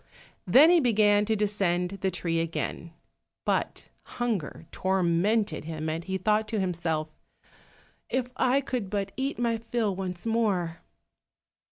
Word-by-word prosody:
Then 300 Hz, +6 st, +7 dB
he 350 Hz, -, +6 dB
began 210 Hz, -5 st, +4 dB
to 220 Hz, +1 st, +1 dB
descend 195 Hz, -3 st, 0 dB
the 190 Hz, -, +1 dB
tree 170 Hz, -2 st, -1 dB
again, 165 Hz, 0 st, -3 dB, 0.5 s
but -, -, -1 dB, 0.3 s
hunger 215 Hz, -10 st, -2 dB
tormented 190 Hz, 0 st, +1 dB
him, 160 Hz, -1 st, -4 dB
and 160 Hz, +2 st, -3 dB
he 190 Hz, +1 st, -2 dB
thought 210 Hz, +3 st, +1 dB
to 220 Hz, -1 st, -2 dB
himself, 165 Hz, -4 st, -1 dB, 1.0 s
"If 260 Hz, -1 st, 0 dB
I 255 Hz, +2 st, +2 dB
could 250 Hz, -7 st, -3 dB
but 200 Hz, -1 st, -2 dB
eat 270 Hz, +2 st, -2 dB
my 230 Hz, -1 st, 0 dB
fill 230 Hz, -3 st, -1 dB
once 180 Hz, -1 st, -5 dB
more!" 200 Hz, -8 st, 0 dB
200 Hz, 135 wpm, -27 LUFS, 175-225 Hz, 1.0 s, Then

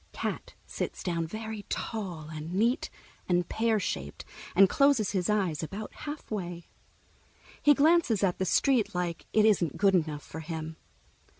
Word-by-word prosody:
Cat -, -, -4 dB
sits -, -, -4 dB
down, 170 Hz, -2 st, -1 dB
very 220 Hz, +3 st, -5 dB
tall 195 Hz, -8 st, -3 dB
and 155 Hz, +3 st, -5 dB
neat 235 Hz, -, +1 dB, 0.4 s
and 175 Hz, -1 st, +2 dB
pear 225 Hz, -1 st, +1 dB
shaped, 70 Hz, -, -4 dB, 0.3 s
and 195 Hz, +1 st, +8 dB
closes 275 Hz, -2 st, +3 dB
his 185 Hz, -2 st, 0 dB
eyes 190 Hz, -8 st, +1 dB
about 200 Hz, +7 st, -6 dB
halfway. 195 Hz, -, -6 dB, 1.0 s
He 295 Hz, 0 st, +6 dB
glances 290 Hz, -, +3 dB
at 180 Hz, -3 st, +1 dB
the 190 Hz, -, +1 dB
street 215 Hz, 0 st, +2 dB
like 175 Hz, -2 st, -3 dB
it 215 Hz, -1 st, +4 dB
isn't 185 Hz, -8 st, +2 dB
good 200 Hz, -1 st, +4 dB
enough 155 Hz, -5 st, 0 dB
for 160 Hz, -, -8 dB
him. 160 Hz, 0 st, -6 dB
195 Hz, 145 wpm, -29 LUFS, 170-220 Hz, 1.0 s, and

